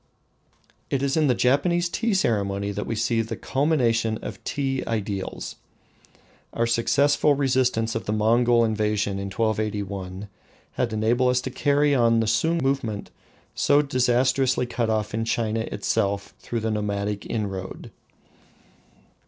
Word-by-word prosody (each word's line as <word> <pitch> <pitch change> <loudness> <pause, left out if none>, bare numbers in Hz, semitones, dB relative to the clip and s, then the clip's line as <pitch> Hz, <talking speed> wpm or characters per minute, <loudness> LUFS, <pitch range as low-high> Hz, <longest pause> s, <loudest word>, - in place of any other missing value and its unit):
It 140 -1 -1
is 140 0 +1
in 155 -2 +3
the 125 - +3
Japanese 170 +9 +2
tea 225 +4 -1
ceremony 100 - 0
that 105 +1 -4
we 115 - -2
see 115 +1 +1
the 110 - -4
culmination 120 -6 +1
of - - -7
tea 135 -2 -2
ideals. 100 -3 -4 1.0
Our 115 - +1
successful 140 +5 +3
resistance 125 -4 +1
of 115 - -4
the - - 0
Mongol 115 +2 +3
invasion 105 -2 0
in 100 - -4
1281 100 -3 -2 0.4
had 120 - -1
enabled 115 +4 +2
us 125 0 +2
to 130 - -5
carry 145 +2 +2
on 115 -3 +3
the 115 - +1
Sung 160 +10 +1
movement 125 -6 -2 0.4
so 145 +1 +3
disastrously 130 0 +2
cut 120 -2 -2
off 110 -1 -1
in 115 +1 -1
China 115 -1 -1
itself 100 -2 -1
through 115 -1 -4
the 110 0 -1
nomadic 105 -1 -2
inroad. 95 -4 -4
115 Hz, 135 wpm, -24 LUFS, 105-130 Hz, 1.0 s, in